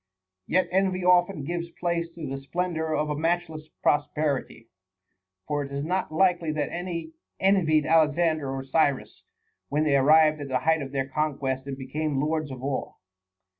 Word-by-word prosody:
Yet 185 - +2
envy 185 -1 +1
often 180 -3 +3
gives 170 +3 -3
place 170 -1 -2
to 165 -2 -6
the 135 0 -5
splendor 160 +2 -2
of 150 0 -1
a - - -1
matchless 160 -1 -2 0.2
prosperity. 145 -5 0 0.8
For 145 -1 -1
it 140 - -8
is 140 +1 -3
not 185 0 -1
likely 175 -1 +2
that 150 -2 -2
any 170 -2 -4 0.3
envied 165 -6 +3
Alexander 155 -1 +2
or 135 0 -4
Cyrus, 140 0 0 0.5
when 150 +2 +1
they 150 -2 +2
arrived 155 +2 +5
at 145 - -5
the 130 -1 0
height 160 +2 +2
of 135 -1 -6
their 135 -1 -1
conquests 135 -2 -2
and 135 -1 -5
became 140 +2 -2
lords 155 +1 -1
of 130 -1 -8
all. 140 -1 -3
155 Hz, 165 wpm, -26 LUFS, 140-170 Hz, 0.8 s, arrived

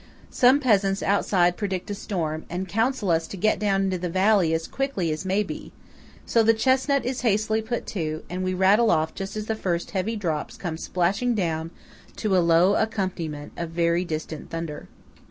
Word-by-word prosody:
Some 255 +3 +5
peasants 200 -7 +2
outside 180 -3 +2
predict 195 -2 -3
a - - -1
storm, 165 -6 -3
and 180 +2 -3
counsel 225 0 0
us 165 0 +1
to 195 - -8
get 215 +4 +1
down 195 -2 +1
into 190 -2 -1
the 180 0 -3
valley 190 -1 +3
as 160 0 -1
quickly 270 - -2
as 155 +4 -4
may 195 +3 +1
be; - - -8 0.5
so 230 - +3
the 225 0 +4
chesnut 265 +3 +2
is 255 0 -2
hastily 220 -1 +1
put 240 +2 -3
to, 155 -5 -3
and 185 +1 -4
we 185 0 -1
rattle 200 +5 +4
off 160 -5 +1
just 195 +2 -6
as 215 - -3
the 220 - -1
first 175 -5 -2
heavy 205 +3 -1
drops 165 -8 -3
come 170 -4 -4
splashing 195 +9 0
down 165 -4 -1 0.5
to 205 -3 0
a - - +5
low 170 +3 +4
accompaniment 175 -9 -2
of 170 -1 -4
very 170 +1 +1
distant 155 -2 -5
thunder. 165 -2 -5
190 Hz, 190 wpm, -25 LUFS, 170-215 Hz, 0.5 s, Some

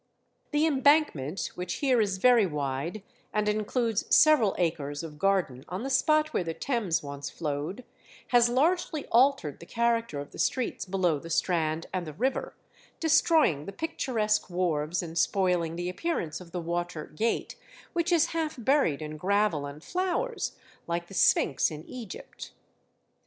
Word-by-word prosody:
The 295 +1 +2
embankment, 280 - +2
which 180 0 -4
here 260 -5 +2
is 195 -3 0
very 235 -1 +5
wide, 150 +6 -3 0.3
and 210 0 0
includes 215 +1 0
several 295 -11 +5
acres 155 -4 -1
of 150 -2 -9
garden 180 -10 +1
on 185 +6 -4
the 270 - -3
spot 310 +3 +3
where - - +1
the 165 -1 -4
Thames 230 - -1
once 140 0 -6
flowed, 155 - -4 0.5
has 240 -1 +5
largely 310 +4 +1
altered 240 - +3
the 170 - -12
character 230 -8 0
of 145 - -8
the - - -11
streets 255 -3 -1
below 180 -5 +1
the 165 - -10
Strand 165 -1 0
and 180 -3 -2
the 155 - -6
river, 255 - -2 0.4
destroying 315 - +3
the - - -4
picturesque 220 -6 -1
wharves 175 -1 -1
and 165 0 -3
spoiling 180 -4 +1
the 175 +1 -3
appearance 180 - -3
of 170 -2 -13
the 180 - -3
Water 170 -1 -3
Gate, 225 +9 -2 0.4
which 345 0 0
is 335 -1 +4
half 320 -2 -1
buried 240 - +2
in 155 0 -6
gravel 190 -4 +1
and 145 +3 -10
flowers, 375 +7 -2 0.3
like 170 0 -3
the - - -11
Sphynx 145 -6 +3
in 155 0 -8
Egypt. 235 -6 -9
190 Hz, 155 wpm, -28 LUFS, 160-255 Hz, 0.5 s, very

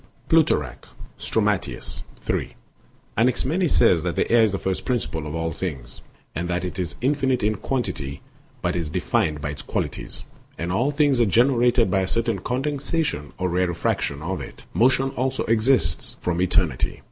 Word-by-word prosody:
Plut. - - +5 0.7
Strom. - - 0
3; - - -6
Dox. - - -6 0.2
579. - - -2 0.6
Anaximenes 135 - +2
says 85 -3 +5
that 85 +1 -2
air 120 0 +6
is 110 - +3
the 95 - -1
first 95 -1 -2
principle 95 - -2
of 75 - -5
all 80 0 -1
things, 70 -8 -5 0.3
and 85 +1 -3
that 90 0 -1
it 90 +1 -5
is 85 -5 -2
infinite 130 -2 +1
in 105 +1 +3
quantity 90 - -3 0.4
but - - 0
is 85 -3 -2
defined 75 0 0
by 75 - -2
its 75 - -7
qualities; - - -4 0.3
and 85 +2 -3
all 120 +9 +2
things 145 -4 +3
are 115 - +4
generated 120 0 +4
by 95 - +3
a 95 - 0
certain 115 -1 0
condensation 135 - -2
or 95 - 0
rarefaction 85 -5 0
of 95 +3 -3
it. - - -10
Motion 130 +3 +3
also 130 +1 -1
exists 110 -7 +1
from 90 0 -1
eternity. 90 -7 +1
95 Hz, 165 wpm, -24 LUFS, 85-125 Hz, 0.7 s, air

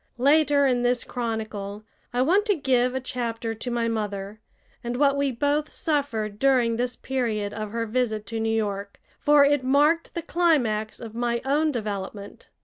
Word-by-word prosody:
Later 285 +2 +4
in 250 -2 +2
this 245 0 +1
chronicle 215 -4 -4 0.3
I 245 +1 +1
want 390 +9 +3
to 410 - +3
give 255 -4 +1
a - - 0
chapter 235 -3 -3
to 225 +3 -6
my 235 -1 0
mother 205 -2 -3 0.4
and 240 +1 -3
what 280 0 +3
we 280 -1 +1
both 290 +5 0
suffered 230 -9 -2
during 255 -4 +3
this 245 +1 -2
period 220 -6 -2
of 215 -1 -4
her 230 +2 -2
visit 220 -2 -1
to 225 +2 -4
New 225 0 0
York, 200 -2 -3 0.2
for 295 -1 +5
it 285 -2 +2
marked 295 +5 +2
the 340 - -3
climax 245 -13 +1
of 225 -2 -8
my 235 0 -1
own 300 +3 +2
development. 205 -4 -6
245 Hz, 170 wpm, -25 LUFS, 220-280 Hz, 0.4 s, for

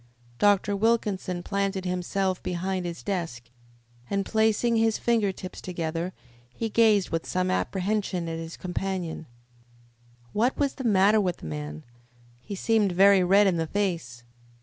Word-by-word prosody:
Dr. 205 0 +3
Wilkinson 200 -4 0
planted 195 -1 -1
himself 180 +1 -1
behind 180 +1 -2
his 170 -1 -7
desk, 160 -12 -4 0.6
and, 200 -1 0
placing 220 +1 +2
his 225 -1 +2
finger 225 -4 +1
tips 185 0 -9
together, 170 0 -3 0.4
he 225 - -2
gazed 215 -3 +3
with 165 0 -2
some 185 0 0
apprehension 190 -2 -1
at 165 0 -4
his 165 0 -7
companion. 180 -3 -4 1.1
What 235 +5 +1
was 280 -2 +1
the 265 - -7
matter 210 -1 +4
with 180 -3 -1
the - - -11
man? 75 0 -6 0.6
He 200 +11 -7
seemed 210 -1 +2
very 195 +1 +6
red 195 +3 +5
in 185 -3 +2
the 165 -1 -1
face. 165 -12 -2
190 Hz, 145 wpm, -26 LUFS, 175-205 Hz, 1.1 s, very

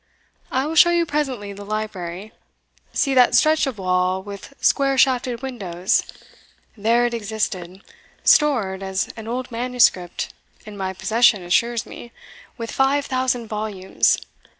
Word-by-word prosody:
I 260 +1 0
will 310 - -3
show 335 +2 +7
you 345 -1 +2
presently 265 -10 -3
the 200 +1 -9
library; 205 -2 -5 0.6
see 275 - +1
that 250 -1 +5
stretch 310 +3 +4
of 255 -5 -4
wall 185 0 0
with 200 +5 -9
square 275 -1 +2
shafted 255 -2 +2
windows 190 -9 -1 0.7
there 230 +3 +2
it 240 - -1
existed, 205 -4 -4 0.4
stored, 230 -11 +3
as 190 0 -2
an 225 -1 -9
old 250 +2 -4
manuscript 230 -7 +1 0.3
in 210 -1 -9
my 190 -1 -3
possession 220 0 +3
assures 235 +6 +1
me, 240 - -11 0.5
with 230 -2 -5
five 275 +1 +1
thousand 255 -2 -1
volumes. 210 -3 0
230 Hz, 135 wpm, -21 LUFS, 195-255 Hz, 0.7 s, show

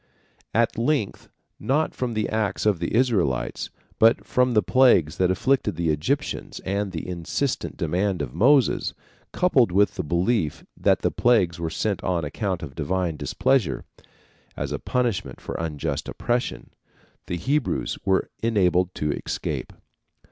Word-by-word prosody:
At 115 0 +2
length, 130 -4 -1 0.3
not 150 +4 0
from 120 -3 -3
the 110 -1 0
acts 105 -3 -1
of 105 -5 +3
the 85 - -2
Israelites, 105 - +1 0.3
but 115 +1 +4
from 125 -1 +2
the 105 - +4
plagues 120 - +4
that 90 -1 +3
afflicted 130 +3 +1
the 85 -1 0
Egyptians 140 - -2
and 100 +1 -2
the 80 -1 -5
insistent 90 - -2
demand 90 +1 0
of 65 -3 -6
Moses, 135 +1 +3 0.4
coupled 130 - +3
with 100 +3 +3
the - - -1
belief 85 +1 0
that - - +2
the - - +2
plagues 100 -9 +2
were 85 -1 -2
sent 100 +4 -2
on 85 -4 0
account 90 +3 -3
of 70 -4 -7
divine 85 +2 -1
displeasure, 85 - 0 0.7
as - - -3
a - - -2
punishment 105 - -1
for - - -6
unjust 80 -3 -3
oppression, 120 +1 -2 0.6
the 90 - -2
Hebrews 140 - -1
were 95 -1 +2
enabled 90 -5 +2
to 75 -1 -1
escape. - - -4
100 Hz, 145 wpm, -24 LUFS, 85-120 Hz, 0.7 s, but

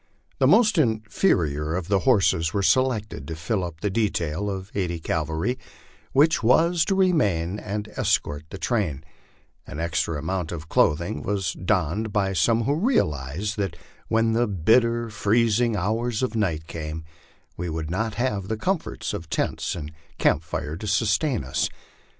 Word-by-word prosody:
The - - +4
most 220 -6 +5
inferior 100 - +1
of 90 -2 -3
the 100 -1 +2
horses 90 -7 +3
were 100 - +1
selected 125 -3 +1
to 80 - -4
fill 95 +5 -1
up 85 -2 -6
the 105 - 0
detail 100 -3 -1
of 95 -1 -5
eighty 90 -4 -2
cavalry 80 - -1 0.5
which 150 +4 +4
was 165 +9 +4
to 195 - +1
remain 105 - +2
and 105 0 -4
escort 75 -6 -1
the 95 - -7
train; 95 - -1 0.6
an 75 - -7
extra 85 -1 -1
amount 85 +2 -3
of 75 -3 -6
clothing 75 -1 +1
was 95 -1 -1
donned 95 +3 -1
by 100 -1 +1
some 110 +7 +2
who 140 - +1
realized 105 - 0
that 95 -4 -2 0.3
when 115 0 +2
the 120 +1 +2
bitter, 115 +5 +2
freezing 115 +2 +2
hours 110 +5 -1
of 125 - -1
night 85 -8 0
came 80 -1 -6 0.5
we 90 0 -4
would 80 0 -4
not 110 +3 -1
have 105 -6 -1
the 110 - -2
comforts 185 - -2
of 85 -1 -6
tents - - -1
and 75 -3 -6 0.3
camp - - +3
fire 80 -1 -4
to 105 - -6
sustain 105 - +1
us. 65 - -1
100 Hz, 155 wpm, -24 LUFS, 80-115 Hz, 0.6 s, most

